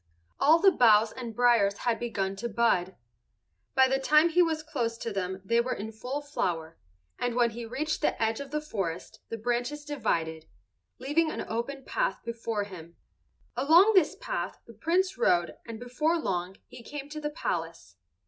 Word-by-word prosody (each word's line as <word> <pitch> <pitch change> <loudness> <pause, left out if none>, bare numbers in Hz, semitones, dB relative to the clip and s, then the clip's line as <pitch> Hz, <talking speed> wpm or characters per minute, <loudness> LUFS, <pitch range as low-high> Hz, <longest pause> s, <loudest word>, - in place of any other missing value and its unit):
All 315 +3 +6
the 390 +3 +6
boughs 220 - +5
and 235 -4 -7
briers 235 -5 +3
had 235 -2 -1
begun 195 -5 -2
to 235 +4 -3
bud. 200 -5 +1 0.8
By 265 0 +6
the 270 +1 +1
time 305 +4 +5
he 345 +2 +4
was 320 -2 +1
close 245 -7 -2
to 230 - -4
them 190 -1 -3
they 230 +3 +3
were 255 +2 -2
in 220 +2 -6
full 250 +6 -5
flower, 165 - -3 0.4
and 245 -1 -1
when 240 -1 +3
he 230 +1 -7
reached 305 +6 -2
the - - 0
edge 225 0 0
of 280 -1 -7
the 300 +2 -2
forest 195 - -4
the 230 - -4
branches 245 +6 -2
divided, 165 - -2 0.5
leaving 295 +5 +1
an - - -4
open 255 +4 -4
path - - -1
before 230 -2 -2
him. 170 -4 -11 0.6
Along 340 +9 +6
this 370 -6 +4
path - - -4
the 230 - -13
Prince 365 - 0
rode 175 -1 +2
and 225 -1 -7
before 280 +7 0
long 185 - -3
he 250 -1 -12
came 285 +3 -7
to 305 +1 -6
the 295 - -2
palace. 165 - -4
240 Hz, 175 wpm, -28 LUFS, 205-295 Hz, 0.8 s, All